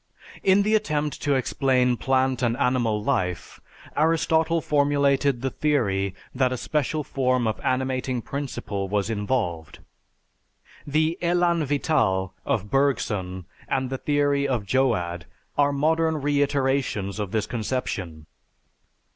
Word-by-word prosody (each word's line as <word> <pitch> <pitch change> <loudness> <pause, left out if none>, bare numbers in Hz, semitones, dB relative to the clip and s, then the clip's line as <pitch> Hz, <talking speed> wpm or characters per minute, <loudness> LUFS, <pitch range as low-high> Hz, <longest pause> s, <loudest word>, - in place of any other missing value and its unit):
In 195 +1 +4
the 215 +2 +1
attempt 150 -9 0
to 145 -2 +1
explain 130 -1 +2
plant 130 0 +1
and 120 -1 +1
animal 120 -4 +1
life, 90 -10 -2 0.3
Aristotle 160 +1 +2
formulated 140 -3 +2
the 135 - 0
theory 100 -12 0 0.2
that 130 -1 +1
a 130 - -2
special 150 +3 -1
form 130 -2 0
of 110 - -1
animating 130 -1 -1
principle 105 -8 -4
was 105 +2 0
involved. 100 - -2 1.1
The 155 +4 +1
"élan 170 -2 +2
vital" 115 - +1
of 105 -8 -1
Bergson 105 -10 0 0.2
and 130 -1 -1
the 135 - -3
theory 145 -1 +1
of 120 -6 -1
Joad 90 -10 0 0.3
are 145 0 +3
modern 160 +2 +1
reiterations 135 -8 0
of 105 -2 -2
this 110 +1 -1
conception. 100 -9 -4
130 Hz, 120 wpm, -25 LUFS, 110-145 Hz, 1.1 s, In